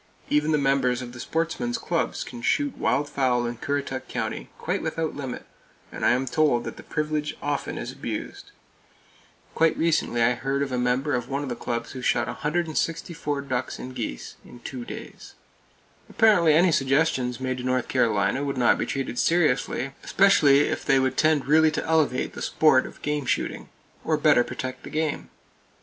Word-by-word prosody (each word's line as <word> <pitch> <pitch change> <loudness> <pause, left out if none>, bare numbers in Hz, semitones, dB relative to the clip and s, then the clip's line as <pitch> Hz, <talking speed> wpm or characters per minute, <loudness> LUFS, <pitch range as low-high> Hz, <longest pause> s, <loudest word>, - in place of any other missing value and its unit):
Even 150 +1 +2
the 150 - +3
members 135 -3 +1
of 120 -1 -9
the 120 - -10
sportsmen's 170 - -2
clubs 175 -7 -2
can 120 -2 -9
shoot 285 - +1
wild 145 +1 0
fowl 130 -4 +1
in 120 0 -4
Currituck 140 0 -3
County, - - -4
quite - - -2
without 160 -1 -2
limit; 135 -3 -6 0.5
and - - -7
I - - +5
am 130 +2 0
told 130 -2 +2
that - - -7
the - - -9
privilege 150 -1 -2
often 145 -1 -3
is - - -5
abused. - - -6 1.0
Quite 165 0 +2
recently 155 -7 +1
I 125 +2 +4
heard 135 +3 -1
of 135 - -4
a 125 - -1
member 125 +4 0
of 125 -1 -2
one 140 +1 -2
of 140 - -5
the 120 - -3
clubs 115 0 -4
who 130 - -7
shot 120 -1 +1
164 155 -1 -2
ducks 130 -3 -3
and 130 - -8
geese 115 - -5
in 125 - -14
two 125 -1 -6
days! - - -10 0.7
Apparently 180 -8 +4
any 175 +2 +5
suggestions 135 -3 +1
made 130 -1 -2
to - - -6
North 130 -1 0
Carolina 115 +1 +1
would 140 -2 -3
not 125 -1 +3
be - - -1
treated 135 -3 -3
seriously, 145 -5 +1
especially 150 -8 +5
if - - -1
they 135 - +3
would 130 0 +1
tend 155 -2 +2
really 155 +2 +5
to 155 - -3
elevate 155 -6 +1
the - - -8
sport 150 -5 +3
of - - -15
game 150 -2 -2
shooting, - - -2 0.3
or 155 - +1
better 150 -4 +4
protect 130 +1 -6
the - - -9
game. 155 -1 -2
140 Hz, 180 wpm, -25 LUFS, 125-155 Hz, 1.0 s, I